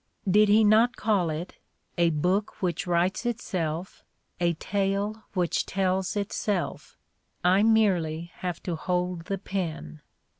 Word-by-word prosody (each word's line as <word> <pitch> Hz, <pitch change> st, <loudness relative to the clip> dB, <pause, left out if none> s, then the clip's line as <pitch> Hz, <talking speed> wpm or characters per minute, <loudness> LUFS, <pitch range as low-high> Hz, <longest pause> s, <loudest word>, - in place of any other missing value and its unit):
Did 210 Hz, +2 st, +5 dB
he 215 Hz, +2 st, +6 dB
not 225 Hz, +4 st, +5 dB
call 200 Hz, -6 st, +1 dB
it 160 Hz, +3 st, -5 dB, 0.4 s
"a 170 Hz, -1 st, +3 dB
book 180 Hz, +7 st, 0 dB
which 180 Hz, -2 st, -2 dB
writes 175 Hz, +4 st, +1 dB
itself, 185 Hz, -8 st, -3 dB, 0.4 s
a 170 Hz, -1 st, +2 dB
tale 200 Hz, +4 st, -2 dB
which 175 Hz, -2 st, +1 dB
tells 190 Hz, 0 st, 0 dB
itself: 200 Hz, -2 st, -3 dB, 0.5 s
I 185 Hz, +3 st, +4 dB
merely 180 Hz, -7 st, +2 dB
have 180 Hz, -2 st, -4 dB
to 175 Hz, -, -2 dB
hold 180 Hz, 0 st, -2 dB
the 195 Hz, -, -2 dB
pen"? 160 Hz, -, -5 dB
185 Hz, 125 wpm, -27 LUFS, 170-205 Hz, 0.5 s, he